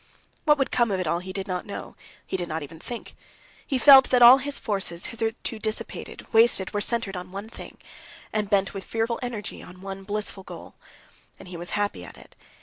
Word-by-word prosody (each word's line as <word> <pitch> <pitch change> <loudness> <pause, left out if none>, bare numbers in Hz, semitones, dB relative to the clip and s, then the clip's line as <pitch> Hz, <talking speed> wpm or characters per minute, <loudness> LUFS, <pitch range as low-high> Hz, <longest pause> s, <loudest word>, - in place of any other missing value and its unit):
What 300 -1 +5
would 270 - 0
come 240 -2 +2
of 195 -2 -1
it 185 - -1
all 170 +2 0
he 185 +1 -7
did 195 +1 -4
not 180 -2 -2
know, 200 - -7 0.3
he - - -4
did 175 -2 -2
not 160 -1 -3
even 160 +2 -10
think. 240 +6 -8 0.5
He 270 - 0
felt 265 0 +8
that 250 -1 +5
all 250 +3 +10
his 285 +1 -4
forces, 190 -5 -3
hitherto 225 0 -4
dissipated, 215 0 -4
wasted, 225 -4 +4
were 205 - 0
centered 215 -3 +1
on 180 0 -7
one 200 +3 -6
thing, - - -11 0.6
and 210 -2 -1
bent 195 -2 +2
with 195 -1 -6
fearful 230 +1 -2
energy 240 -4 -5
on 180 +1 -13
one 195 0 -6
blissful 205 -1 -3
goal. - - -11 0.6
And 185 - -12
he 180 - -8
was 175 +1 -3
happy 205 - -2
at 90 - -12
it. - - -17
205 Hz, 210 wpm, -25 LUFS, 185-235 Hz, 0.6 s, all